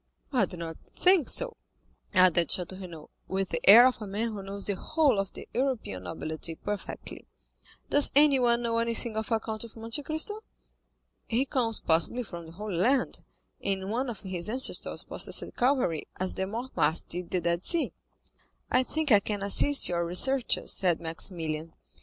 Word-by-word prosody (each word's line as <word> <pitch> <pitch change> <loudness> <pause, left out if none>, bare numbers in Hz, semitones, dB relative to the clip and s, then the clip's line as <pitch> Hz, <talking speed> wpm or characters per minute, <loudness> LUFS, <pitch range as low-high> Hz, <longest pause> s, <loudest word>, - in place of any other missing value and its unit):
"I 245 -6 +3
do 180 - -9
not 165 -1 -6 0.2
think 365 -6 +3
so," - - +1 0.5
added 180 -3 +4
Château 185 +1 -3
Renaud, 165 -4 -10 0.2
with 190 0 -2
the - - -3
air 235 +5 +10
of 255 -3 +1
a 210 - -6
man 210 +4 -2
who 205 -2 -6
knows 195 +1 -7
the 200 - 0
whole 290 - +1
of 195 -1 -3
the - - -9
European 240 - -2
nobility 160 - -4
perfectly. 205 +4 -6 0.6
"Does 290 0 +6
anyone 255 -5 +4
know 230 -1 0
anything 230 0 -1
of 220 +1 -4
a 225 - +2
Count 220 0 -5
of 230 - -11
Monte 225 +5 -2
Cristo?" 315 +9 -3 0.9
"He 240 +4 0
comes 240 -6 0
possibly 170 +10 +1
from 170 -6 -9
the 165 - -12
Holy 205 -1 -5
Land, 255 +9 +1 0.4
and 195 0 -2
one 250 +3 -1
of 220 -5 -7
his 185 -2 -3
ancestors 255 +4 +1
possessed - - +1
Calvary, 245 - 0
as 185 0 +1
the 190 - -3
Mortemarts 215 - -1
did 175 0 -2
the 185 - 0
Dead 170 +1 -1
Sea." 340 -2 +1 0.8
"I - - +4
think 305 +2 -2
I 210 - +7
can 205 0 -4
assist 275 +8 +4
your 170 -1 -1
researches," 240 +10 +2
said 175 -3 +1
Maximilian. 165 -1 -4
210 Hz, 170 wpm, -28 LUFS, 175-250 Hz, 0.9 s, air